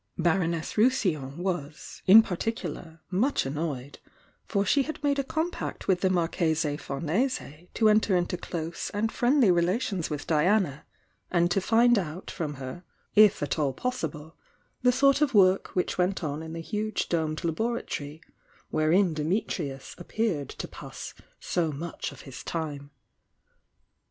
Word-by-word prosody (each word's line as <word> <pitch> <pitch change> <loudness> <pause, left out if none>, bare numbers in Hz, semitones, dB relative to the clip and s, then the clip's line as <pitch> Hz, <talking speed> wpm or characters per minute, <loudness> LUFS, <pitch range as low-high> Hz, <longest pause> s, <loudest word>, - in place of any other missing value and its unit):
Baroness 170 -1 0
de 210 - +2
Rousillon 165 - +1
was, 175 -5 -4
in 215 +4 +10
particular, 175 -5 -4
much 230 - +1
annoyed, 140 -1 -4 0.5
for 200 -1 +1
she 280 +8 +3
had 300 +2 -4
made 285 -1 +2
a - - +1
com 320 +5 -1
pact - - -6
with 180 -2 +2
the 190 - +3
Marchese 165 -4 +1
Famese 165 - -3
to 220 - +4
enter 215 -2 +4
into 175 0 0
close 170 -2 -4
and 220 +2 0
friendly 245 -4 +4
relations 180 +1 0
with 150 -1 -4
Diana, 165 -1 +1 0.4
and 175 -1 +2
to 195 - +2
find 235 +3 +4
out 175 0 -6
from 155 -5 -4
her, 135 +6 -7 0.3
if 210 -6 +6
at 145 - -1
all 140 -3 +1
possible, 160 - -4 0.5
the 250 - +5
sort 275 +3 +4
of 280 -5 +2
work 190 -1 +4
which 180 0 -1
went 180 +1 +1
on 150 0 -3
in 160 0 -7
the 165 - -5
huge 215 +4 -2
domed 160 -1 -1
laboratory 165 -5 -3 0.5
wherein 165 +3 +3
Dimitrius 155 -4 -2
appeared 175 - -2
to - - -6
pass - - -9 0.3
so 165 -3 -1
much 165 +4 -5
of - - -12
his 135 -3 -9
time. 145 -4 -4
175 Hz, 150 wpm, -27 LUFS, 155-215 Hz, 0.5 s, in